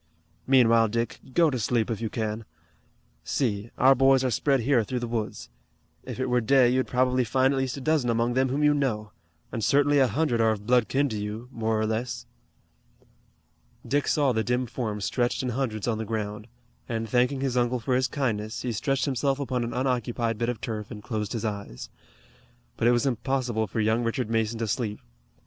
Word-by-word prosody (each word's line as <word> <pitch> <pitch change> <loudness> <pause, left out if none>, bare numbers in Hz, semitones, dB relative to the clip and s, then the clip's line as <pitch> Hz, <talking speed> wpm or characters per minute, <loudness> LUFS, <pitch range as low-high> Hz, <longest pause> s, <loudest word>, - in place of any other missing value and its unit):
Meanwhile, 115 -4 +5
Dick, 115 +1 -2 0.2
go 165 -3 +4
to 130 - -2
sleep 115 +1 0
if 115 - -3
you 115 - -2
can. 110 -1 -3 0.8
See, 110 -5 -1
our 135 +2 +6
boys 135 0 +4
are 130 - +1
spread 135 +2 +2
here 125 -1 +3
through 125 +4 -4
the 120 -1 -3
woods. 105 - -4 0.5
If - - -7
it 130 - 0
were 125 -1 +1
day 125 +1 +4
you'd 130 +1 +1
probably 125 0 +2
find 130 +3 +2
at 135 - 0
least 130 0 -2
a - - -6
dozen 150 -3 +1
among 115 +1 +1
them 130 +1 +2
whom 140 +3 0
you 150 0 +5
know, 110 -8 -1 0.4
and 115 -3 -3
certainly 145 +4 +3
a 135 - +5
hundred 125 -3 0
are 110 - +4
of 105 -1 -8
blood 125 -1 +3
kin 140 +2 +1
to 110 -3 -3
you, 110 +4 -6
more 110 -2 -1
or 110 - +1
less." 110 +3 -3 1.6
Dick 145 +1 +1
saw 145 -3 +2
the 110 -2 0
dim 125 +2 0
forms 110 -4 -4
stretched 120 +1 0
in 125 - -1
hundreds 115 -4 -2
on 110 -2 0
the - - -2
ground, 105 0 -4 0.4
and, 115 -1 -2
thanking 125 +4 +1
his 135 -2 -1
uncle 125 0 +1
for 125 +3 -1
his 130 +1 +2
kindness, 110 -6 -2
he 125 - -1
stretched 135 +5 0
himself 135 0 0
upon 125 -3 -1
an 115 - -3
unoccupied 120 -3 -1
bit 120 0 0
of 120 - -3
turf 110 -3 -5
and 105 -3 -9
closed 110 -2 -3
his 115 -2 -3
eyes. 100 - -5 0.9
But 115 - +1
it - - +6
was 120 +1 +2
impossible 125 -3 -1
for 110 - -4
young 110 +2 +2
Richard 115 0 -2
Mason 115 0 0
to 115 0 -2
sleep. 105 -1 -2
120 Hz, 205 wpm, -26 LUFS, 110-130 Hz, 1.6 s, our